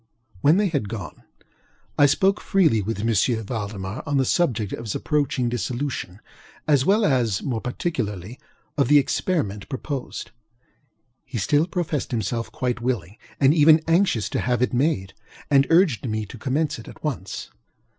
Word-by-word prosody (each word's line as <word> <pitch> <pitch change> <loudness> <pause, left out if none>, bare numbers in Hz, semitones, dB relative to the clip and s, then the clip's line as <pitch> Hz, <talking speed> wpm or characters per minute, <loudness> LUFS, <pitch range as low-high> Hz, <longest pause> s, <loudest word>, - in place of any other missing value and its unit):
When 150 +5 +5
they 205 -1 +2
had 140 - -2
gone, 100 -8 -7 0.7
I 145 - +6
spoke 195 +8 +2
freely 160 - +3
with 100 0 -3
M. 115 +1 +1
Valdemar 100 -1 -4
on 145 -1 +1
the 135 - +3
subject 120 - 0
of 115 - -5
his 105 - -3
approaching 140 -4 0
dissolution, 120 -3 -3 0.5
as 145 -4 +4
well 205 +6 +3
as, 120 - +1
more 120 -5 -2
particularly, 120 - -4 0.4
of 140 - +3
the 150 - +6
experiment 135 - -1
proposed. 135 0 -5 0.9
He 130 -4 -6
still 145 - +2
professed 170 -5 -2
himself 115 0 -2
quite 125 -2 -2
willing 110 -6 -2 0.2
and 140 +1 +5
even 155 0 +6
anxious 165 - +2
to - - -2
have 125 -1 +1
it 125 - 0
made, 120 -8 0 0.4
and 140 -1 +5
urged 165 - +3
me 110 0 -2
to 105 - -11
commence 145 +5 -1
it - - -12
at - - -13
once. 125 - -4
125 Hz, 155 wpm, -23 LUFS, 110-150 Hz, 0.9 s, I